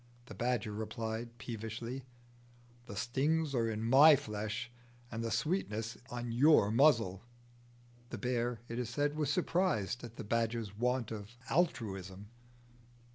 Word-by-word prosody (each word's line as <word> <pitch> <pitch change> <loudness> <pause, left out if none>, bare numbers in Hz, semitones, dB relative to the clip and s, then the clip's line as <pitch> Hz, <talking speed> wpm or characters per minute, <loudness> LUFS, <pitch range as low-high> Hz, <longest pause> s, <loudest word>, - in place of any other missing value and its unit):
The 105 - -10
badger 120 0 -1
replied, 110 +2 -4
peevishly, 115 +3 -5 0.8
"The 100 - -7
stings 140 +7 0
are 115 -3 +1
in 110 0 -3
my 140 +6 +8
flesh, 110 -2 -4 0.4
and 115 0 -3
the 115 - -1
sweetness 115 - -1
is - - -22
on 120 -2 -4
your 125 -4 +5
muzzle." 115 -7 +4 0.9
The 120 - -5
bear, 120 0 -1
it 115 +1 -4
is 120 -2 -2
said, 145 +4 0
was 155 -2 0
surprised 175 - 0
at 120 -1 -8
the - - -6
badger's 115 -1 -1
want 125 +1 0
of 110 +2 -7
altruism. 105 - -1
115 Hz, 135 wpm, -34 LUFS, 110-130 Hz, 0.9 s, my